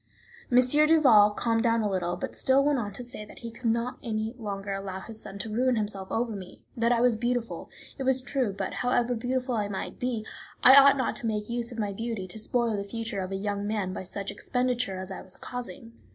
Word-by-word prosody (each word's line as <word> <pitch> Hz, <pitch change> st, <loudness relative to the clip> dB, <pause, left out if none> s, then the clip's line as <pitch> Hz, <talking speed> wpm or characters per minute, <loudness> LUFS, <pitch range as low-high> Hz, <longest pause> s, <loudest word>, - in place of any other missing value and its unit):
M. 245 Hz, -, +5 dB
Duval 295 Hz, -7 st, +6 dB
calmed 225 Hz, +2 st, 0 dB
down 230 Hz, -1 st, +2 dB
a -, -, +1 dB
little, 180 Hz, -3 st, -1 dB
but 270 Hz, -, -5 dB
still 265 Hz, +1 st, +3 dB
went 290 Hz, -2 st, +2 dB
on 205 Hz, -3 st, -3 dB
to 245 Hz, -, -7 dB
say 240 Hz, -3 st, -5 dB
that 210 Hz, -, -13 dB
he 230 Hz, -, -5 dB
could 230 Hz, +1 st, -2 dB
not 235 Hz, +2 st, -1 dB
any 220 Hz, -1 st, -2 dB
longer 200 Hz, -2 st, -4 dB
allow 195 Hz, -1 st, -4 dB
his 220 Hz, +3 st, -9 dB
son 195 Hz, -, -8 dB
to 210 Hz, +2 st, -5 dB
ruin 250 Hz, +2 st, +2 dB
himself 205 Hz, -3 st, -2 dB
over 230 Hz, -1 st, -1 dB
me; 185 Hz, -2 st, -10 dB
that 235 Hz, 0 st, +2 dB
I 240 Hz, -, +3 dB
was 245 Hz, -2 st, +4 dB
beautiful, 240 Hz, 0 st, -2 dB, 0.3 s
it -, -, -4 dB
was 265 Hz, 0 st, +3 dB
true, 255 Hz, -3 st, -1 dB
but, 195 Hz, -1 st, -4 dB
however 245 Hz, 0 st, +1 dB
beautiful 250 Hz, +2 st, -1 dB
I 210 Hz, -3 st, 0 dB
might 195 Hz, -2 st, -5 dB
be, 240 Hz, -3 st, -2 dB, 0.4 s
I 260 Hz, -, +10 dB
ought 280 Hz, 0 st, +8 dB
not 260 Hz, -, 0 dB
to 235 Hz, -, -4 dB
make 210 Hz, -1 st, -2 dB
use 235 Hz, 0 st, -1 dB
of 235 Hz, -, -8 dB
my 205 Hz, -3 st, -1 dB
beauty 225 Hz, -2 st, -4 dB
to 220 Hz, -, -6 dB
spoil 235 Hz, 0 st, 0 dB
the 200 Hz, -, -2 dB
future 225 Hz, +1 st, -4 dB
of 185 Hz, 0 st, -4 dB
a -, -, -2 dB
young 200 Hz, +1 st, -2 dB
man 205 Hz, -4 st, -1 dB
by -, -, -4 dB
such 195 Hz, +2 st, -5 dB
expenditure 250 Hz, -6 st, -1 dB
as 185 Hz, +1 st, -6 dB
I 190 Hz, -, -6 dB
was 185 Hz, -, -7 dB
causing. 245 Hz, -2 st, -7 dB
225 Hz, 235 wpm, -28 LUFS, 200-245 Hz, 0.4 s, I